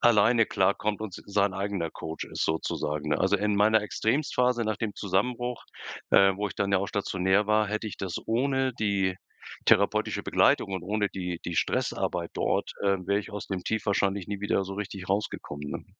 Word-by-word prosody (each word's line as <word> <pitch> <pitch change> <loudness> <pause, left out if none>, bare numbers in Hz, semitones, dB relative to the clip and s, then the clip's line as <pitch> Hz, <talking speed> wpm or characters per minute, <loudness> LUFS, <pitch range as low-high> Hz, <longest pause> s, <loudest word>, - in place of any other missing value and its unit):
alleine 115 0 +5
klarkommt 100 +1 +1
und 105 -4 -5
s - - -12
sein 100 -1 +1
eigener 95 -3 -2
Coach 80 0 -6
ist, - - -4
sozusagen, 75 -1 -2
ne? - - +2
Also, - - +3
in 105 0 0
meiner 105 +1 +4
Extremstphase 125 +1 +1
nach 110 -1 -1
dem 110 -3 -3
Zusammenbruch, 120 +5 -1 0.5
äh, 95 0 +6
wo 105 0 -1
ich - - -9
dann 100 0 -1
ja 95 - +5
auch 100 - -2
stationär 95 0 +1
war, 105 -1 +3
hätte 105 +1 -2
ich 105 - -7
das 95 -3 -4
ohne 130 +2 +1
die 95 -3 +1 0.5
therapeutische - - +3
Begleitung 100 - +3
und 95 -2 -3
ohne 105 +2 0
die 90 -2 -4
die 85 - -3
Stressarbeit - - -1
dort, - - 0
äh, 100 -1 +3
wäre 100 +1 +2
ich 105 - -10
aus 105 -1 -6
dem 95 -2 -3
Tief 110 +3 -2
wahrscheinlich 100 -2 +1
nie 100 -1 -4
wieder 100 -1 +1
so 95 - -6
richtig 100 -2 -6
rausgekommen, 75 -7 -3
ne? - - -6
100 Hz, 190 wpm, -28 LUFS, 95-110 Hz, 0.5 s, äh